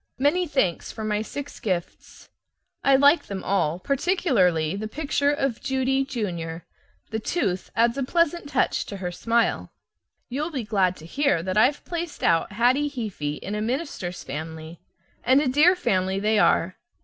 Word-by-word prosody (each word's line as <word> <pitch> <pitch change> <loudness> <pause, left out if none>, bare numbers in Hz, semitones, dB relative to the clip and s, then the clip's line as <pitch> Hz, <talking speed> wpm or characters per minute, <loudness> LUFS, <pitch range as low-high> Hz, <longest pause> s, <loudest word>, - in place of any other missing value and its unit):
Many 310 +7 +2
thanks 265 - 0
for 220 - -7
my 210 -1 0
six 285 +6 -7
gifts. 180 -5 -4 0.6
I 275 - +5
like 285 +4 +5
them 195 -2 -5
all, 175 -5 +1
particularly 220 - +1
the 215 +2 -4
picture 285 +3 0
of 275 -5 -1
Judy, 265 -1 +1
junior; 175 - -4 0.5
the 220 - -1
tooth 195 - -2
adds 235 +3 +2
a - - 0
pleasant 335 +1 0
touch 270 -3 0
to 200 - -6
her 180 -2 -4
smile. 230 +6 0 0.6
You'll 290 +6 -3
be 270 -7 -3
glad 195 -4 +1
to 155 - -13
hear 220 - +1
that 185 0 -2
I've 250 +7 +3
placed 340 -2 -5
out 170 +4 +2
Hattie 255 +7 +2
Heaphy 200 - -4
in 200 - -5
a 210 - -2
minister's 225 - -3
family, 160 +2 -7 0.4
and 260 +2 +5
a 295 - +1
dear 300 +8 +5
family 190 - 0
they 215 +1 +2
are. 180 -2 +2
230 Hz, 160 wpm, -25 LUFS, 185-285 Hz, 0.6 s, I